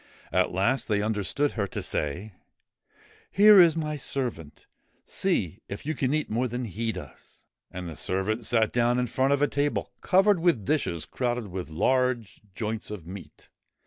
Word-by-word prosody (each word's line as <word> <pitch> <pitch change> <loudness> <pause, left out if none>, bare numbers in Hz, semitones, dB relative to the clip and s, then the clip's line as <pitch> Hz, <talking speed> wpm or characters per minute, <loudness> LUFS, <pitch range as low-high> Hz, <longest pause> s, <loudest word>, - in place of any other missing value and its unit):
At 90 0 +2
last 120 +8 +1
they 105 -2 +1
understood 110 +7 0
her 100 -4 -2
to - - -5
say: 85 +9 -3 0.5
' - - -37 0.3
Here 205 -1 +8
is 165 -2 +5
my 150 -2 -2
servant. 120 - -4 0.4
See 110 - -1
if 100 - -7
you 155 - -1
can 135 -4 -1
eat 155 +1 0
more 120 +4 0
than 120 +1 -4
he 115 +2 -2
does.' 80 -10 -12 0.2
And 90 -1 -7
the 80 - -7
servant 95 +8 -2
sat 110 -1 +2
down 120 0 +2
in 125 - +1
front 130 +3 +1
of 140 0 +2
a - - +4
table 145 0 -1
covered 195 0 +4
with 165 - +2
dishes 90 - 0
crowded 120 -4 -2
with 90 -2 -5
large 120 +5 0
joints 110 -1 -4
of 105 -6 -7
meat. 95 +2 -11
115 Hz, 175 wpm, -27 LUFS, 95-140 Hz, 0.5 s, Here